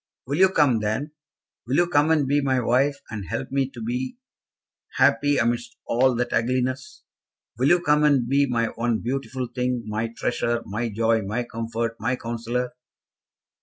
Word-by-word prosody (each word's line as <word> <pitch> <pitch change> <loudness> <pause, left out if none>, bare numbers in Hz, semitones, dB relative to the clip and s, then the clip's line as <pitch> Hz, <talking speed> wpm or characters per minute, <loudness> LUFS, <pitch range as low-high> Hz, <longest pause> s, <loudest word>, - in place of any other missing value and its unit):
"Will 140 +5 -2
you 190 0 +7
come, 145 -10 +3
then? 110 +8 -2 0.6
Will 130 - 0
you 175 - +4
come 150 -2 +3
and 155 -4 +3
be 145 +2 +2
my 130 -2 +1
wife, 130 +4 +2
and 105 -4 -5
help - - -4
me 135 -1 0
to 120 -4 -9
be 125 - -3 0.8
happy 145 -1 +3
amidst 120 0 -1
all 125 +2 +2
that 120 0 -1
ugliness? 130 +2 -1 0.6
Will 130 - +3
you 175 +2 +4
come 150 -2 +3
and 140 -5 +3
be 140 +2 +3
my 115 -2 +1
one 115 -1 -1
beautiful 130 0 -3
thing, 125 -1 -1
my 110 +1 -2
treasure, 120 -1 -1
my 115 +4 -3
joy, 115 +1 +1
my 105 +5 -2
comfort, 115 0 -4
my 125 +4 0
counsellor?" 120 +1 -3
125 Hz, 165 wpm, -24 LUFS, 115-140 Hz, 0.8 s, you